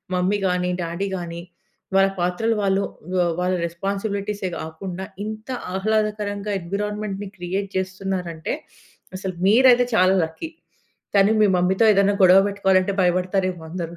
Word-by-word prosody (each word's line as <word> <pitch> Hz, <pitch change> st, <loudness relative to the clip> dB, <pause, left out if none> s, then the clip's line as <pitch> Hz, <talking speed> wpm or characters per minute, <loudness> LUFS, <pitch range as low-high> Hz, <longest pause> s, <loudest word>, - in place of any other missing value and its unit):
Mummy 185 Hz, +3 st, +1 dB
గాని, 180 Hz, 0 st, 0 dB
daddy 170 Hz, +4 st, -3 dB
గాని, 170 Hz, -1 st, -6 dB, 0.5 s
వాళ్ళ 195 Hz, 0 st, +5 dB
పాత్రలు 180 Hz, +6 st, 0 dB
వాళ్ళు, 195 Hz, 0 st, +2 dB, 0.3 s
వా 180 Hz, -1 st, +3 dB
వాళ్ళ 180 Hz, +1 st, +1 dB
రెస్పాన్సిబిలిటీసే 200 Hz, +2 st, -3 dB
కాకుండా, 175 Hz, +4 st, -6 dB, 0.2 s
ఇంత 215 Hz, +3 st, -7 dB, 0.3 s
ఆహ్లాదకరంగా 210 Hz, 0 st, -1 dB
ఎన్విరాన్మెంట్‌ని 205 Hz, +2 st, -4 dB
క్రియేట్ 190 Hz, +3 st, -3 dB
చేస్తున్నారు 190 Hz, -1 st, -3 dB
అంటే, 160 Hz, -, -4 dB, 0.6 s
అసలు 185 Hz, -1 st, -5 dB
మీరైతే 245 Hz, +2 st, +6 dB
చాలా 185 Hz, +1 st, +4 dB
లక్కీ. 160 Hz, -, -8 dB, 0.7 s
కానీ 200 Hz, +2 st, +5 dB
మీ 210 Hz, -, +6 dB
మమ్మీతో 185 Hz, +4 st, +2 dB
ఏదైనా 200 Hz, +1 st, +3 dB
గొడవ 185 Hz, +1 st, +8 dB
పెట్టుకోవాలంటే 195 Hz, -1 st, +2 dB
భయపడతారేమో 185 Hz, 0 st, 0 dB
అందరు. 170 Hz, -1 st, -5 dB
190 Hz, 125 wpm, -22 LUFS, 180-205 Hz, 0.7 s, గొడవ